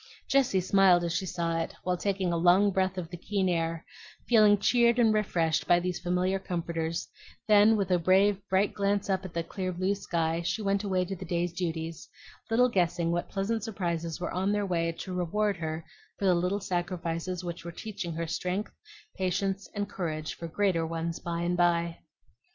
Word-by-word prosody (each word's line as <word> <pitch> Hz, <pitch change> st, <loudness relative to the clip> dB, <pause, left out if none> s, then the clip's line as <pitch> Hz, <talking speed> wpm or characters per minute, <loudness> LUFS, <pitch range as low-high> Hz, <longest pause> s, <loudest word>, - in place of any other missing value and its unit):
Jessie 255 Hz, -9 st, +3 dB
smiled 185 Hz, -1 st, +4 dB
as 170 Hz, -1 st, -1 dB
she 185 Hz, +2 st, -1 dB
saw 170 Hz, -1 st, -1 dB
it, 165 Hz, -, -4 dB
while 180 Hz, 0 st, 0 dB
taking 190 Hz, -1 st, -1 dB
a -, -, +1 dB
long 180 Hz, +4 st, +4 dB
breath 190 Hz, 0 st, 0 dB
of 170 Hz, -2 st, -5 dB
the 175 Hz, -, -6 dB
keen 195 Hz, +2 st, -1 dB
air, 165 Hz, -2 st, -1 dB, 0.4 s
feeling 215 Hz, -3 st, +6 dB
cheered 235 Hz, +3 st, +3 dB
and 225 Hz, -3 st, +4 dB
refreshed 170 Hz, -7 st, +1 dB
by 175 Hz, -, +5 dB
these 180 Hz, 0 st, -3 dB
familiar 180 Hz, +2 st, 0 dB
comforters; 170 Hz, -3 st, -3 dB, 0.4 s
then 215 Hz, +1 st, +6 dB
with 195 Hz, -2 st, -1 dB
a 180 Hz, -, +4 dB
brave, 195 Hz, +3 st, +3 dB
bright 190 Hz, +2 st, +2 dB
glance 200 Hz, 0 st, 0 dB
up 190 Hz, 0 st, -1 dB
at 180 Hz, -, -8 dB
the 170 Hz, -, 0 dB
clear 185 Hz, +2 st, -4 dB
blue 185 Hz, +3 st, 0 dB
sky 165 Hz, -4 st, -1 dB
she 210 Hz, +5 st, -2 dB
went 200 Hz, 0 st, +1 dB
away 185 Hz, -2 st, 0 dB
to 195 Hz, +2 st, -4 dB
the 185 Hz, -, -8 dB
day's 175 Hz, 0 st, -1 dB
duties, 165 Hz, -2 st, -4 dB, 0.4 s
little 245 Hz, +3 st, +4 dB
guessing 175 Hz, -6 st, +1 dB
what 175 Hz, 0 st, -2 dB
pleasant 205 Hz, +2 st, -2 dB
surprises 170 Hz, -6 st, -3 dB
were 175 Hz, -, -3 dB
on 190 Hz, +2 st, 0 dB
their 205 Hz, 0 st, 0 dB
way 170 Hz, -3 st, 0 dB
to 185 Hz, +3 st, -7 dB
reward 195 Hz, +3 st, 0 dB
her 160 Hz, -1 st, -4 dB, 0.3 s
for 200 Hz, -, -2 dB
the 185 Hz, -, +5 dB
little 180 Hz, +3 st, 0 dB
sacrifices 175 Hz, -1 st, -3 dB
which 170 Hz, -1 st, -5 dB
were 170 Hz, -, -6 dB
teaching 195 Hz, -1 st, -6 dB
her 165 Hz, +1 st, -3 dB
strength, 180 Hz, +5 st, -3 dB, 0.4 s
patience, 190 Hz, +1 st, -1 dB
and 205 Hz, 0 st, -1 dB
courage 155 Hz, -6 st, -4 dB
for 170 Hz, -, -7 dB
greater 180 Hz, -1 st, +1 dB
ones 165 Hz, 0 st, -3 dB
by 170 Hz, 0 st, -3 dB
and 175 Hz, +1 st, 0 dB
by. 170 Hz, -1 st, +1 dB
180 Hz, 190 wpm, -29 LUFS, 170-200 Hz, 0.4 s, feeling